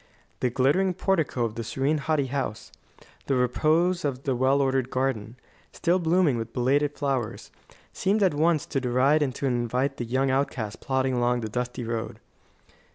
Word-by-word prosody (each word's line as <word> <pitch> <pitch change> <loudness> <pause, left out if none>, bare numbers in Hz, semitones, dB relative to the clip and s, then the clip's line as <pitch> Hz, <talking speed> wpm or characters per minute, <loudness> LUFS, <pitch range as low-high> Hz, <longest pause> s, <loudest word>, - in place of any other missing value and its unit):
The 125 - +1
glittering 145 +10 +2
portico 165 -10 0
of 110 - -4
the 115 - -5
serene, 135 +6 0
haughty 150 -1 0
house, 130 -5 -4 0.6
the 135 - +1
repose 160 +8 +2
of 135 -2 -2
the 135 -3 0
well 130 +3 +2
ordered 135 -2 +1
garden, 130 -4 -2 0.4
still 180 +1 +1
blooming 165 -6 +2
with 115 0 -6
belated 145 +4 +1
flowers, 135 -6 -2 0.4
seemed 205 +2 +1
at 185 - +3
once 155 +1 +2
to 135 - -2
deride 130 +5 +3
and 135 -4 0
to - - -3
invite 125 +2 0
the 120 - -3
young 130 +3 +1
outcast 130 -5 -2
plodding 130 -1 0
along 120 0 +1
the 110 - -4
dusty 125 +2 -3
road. 115 -1 -4
135 Hz, 165 wpm, -26 LUFS, 125-150 Hz, 0.6 s, at